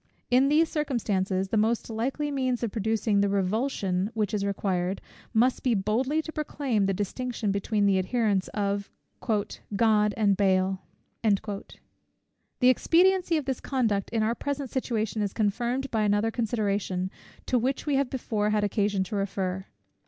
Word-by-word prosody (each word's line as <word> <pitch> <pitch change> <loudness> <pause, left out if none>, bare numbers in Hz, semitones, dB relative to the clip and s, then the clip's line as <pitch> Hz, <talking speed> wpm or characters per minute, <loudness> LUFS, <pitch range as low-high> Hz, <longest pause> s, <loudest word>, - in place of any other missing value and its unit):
In 260 +3 +5
these 315 +3 +4
circumstances, 200 -11 -1
the 220 - +1
most 225 +2 +1
likely 265 +6 -2
means 255 -3 -1
of 230 - -1
producing 215 -1 +1
the 200 - +2
revulsion 195 -1 0
which 210 -2 -1
is 205 -2 0
required, 190 -2 -1 0.3
must 245 +3 +2
be 245 -3 +2
boldly 250 +10 0
to 315 - -6
proclaim 275 -9 -1
the - - +2
distinction 220 +2 -2
between 200 +1 0
the 195 -1 +4
adherents 200 -1 +1
of 200 -1 -2 0.3
"God 210 -1 +1
and 205 -3 +3
Baal." 190 -1 +2 0.4
The 210 +4 -4
expediency 350 +5 +3
of 300 - -3
this 265 -2 -2
conduct 225 -7 0
in 225 -2 0
our 225 +2 +1
present 280 0 -4
situation 225 -4 -1
is 200 -2 -1
confirmed 240 +5 -1
by 220 - +1
another 210 +2 +2
consideration, 205 -5 -1 0.3
to 250 - +2
which 260 +3 -1
we 295 - 0
have 275 -2 +1
before 215 -5 -1
had 210 -1 +1
occasion 205 -1 +1
to 190 - -5
refer. 190 -1 -2
215 Hz, 150 wpm, -27 LUFS, 200-250 Hz, 0.4 s, In